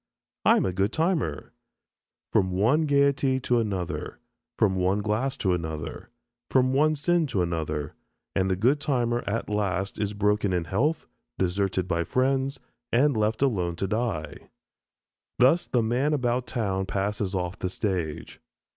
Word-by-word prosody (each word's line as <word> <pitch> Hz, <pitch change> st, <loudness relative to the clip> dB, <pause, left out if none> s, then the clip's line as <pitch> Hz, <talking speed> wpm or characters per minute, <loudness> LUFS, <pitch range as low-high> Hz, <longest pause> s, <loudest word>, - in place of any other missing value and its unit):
"I -, -, +6 dB
am -, -, +1 dB
a 95 Hz, -, -1 dB
good 100 Hz, +3 st, +1 dB
timer." 160 Hz, -, -1 dB, 0.8 s
From 95 Hz, -, +3 dB
one 120 Hz, -, +2 dB
gayety 140 Hz, -2 st, +3 dB
to 120 Hz, -1 st, +2 dB
another, 95 Hz, -6 st, -3 dB, 0.4 s
from 100 Hz, -3 st, +3 dB
one 95 Hz, +3 st, +1 dB
glass 120 Hz, +6 st, -1 dB
to 95 Hz, -7 st, +1 dB
another, 80 Hz, -3 st, -5 dB, 0.4 s
from 130 Hz, 0 st, +3 dB
one 155 Hz, +3 st, +3 dB
sin 165 Hz, +2 st, +1 dB
to 100 Hz, -9 st, 0 dB
another, 80 Hz, -3 st, -3 dB, 0.4 s
and 95 Hz, -1 st, +1 dB
the 95 Hz, -, +2 dB
good 125 Hz, +10 st, +2 dB
timer 120 Hz, -5 st, 0 dB
at 115 Hz, +3 st, -2 dB
last 100 Hz, -2 st, -1 dB
is 105 Hz, 0 st, -2 dB
broken 105 Hz, -1 st, +1 dB
in 90 Hz, -2 st, 0 dB
health, 135 Hz, -, 0 dB, 0.3 s
deserted 95 Hz, 0 st, 0 dB
by 85 Hz, -1 st, 0 dB
friends, 135 Hz, -, 0 dB, 0.3 s
and 135 Hz, +3 st, +3 dB
left 110 Hz, +4 st, +1 dB
alone 90 Hz, -10 st, 0 dB
to 95 Hz, -, -2 dB
die. 105 Hz, -6 st, -3 dB, 0.9 s
Thus 135 Hz, +8 st, +4 dB
the 120 Hz, -3 st, +1 dB
"man 125 Hz, +7 st, +1 dB
about 125 Hz, -2 st, 0 dB
town" 95 Hz, -6 st, -1 dB
passes 100 Hz, 0 st, -2 dB
off 90 Hz, 0 st, -3 dB
the 90 Hz, -, -2 dB
stage. 90 Hz, -6 st, -3 dB
105 Hz, 150 wpm, -26 LUFS, 95-130 Hz, 0.9 s, I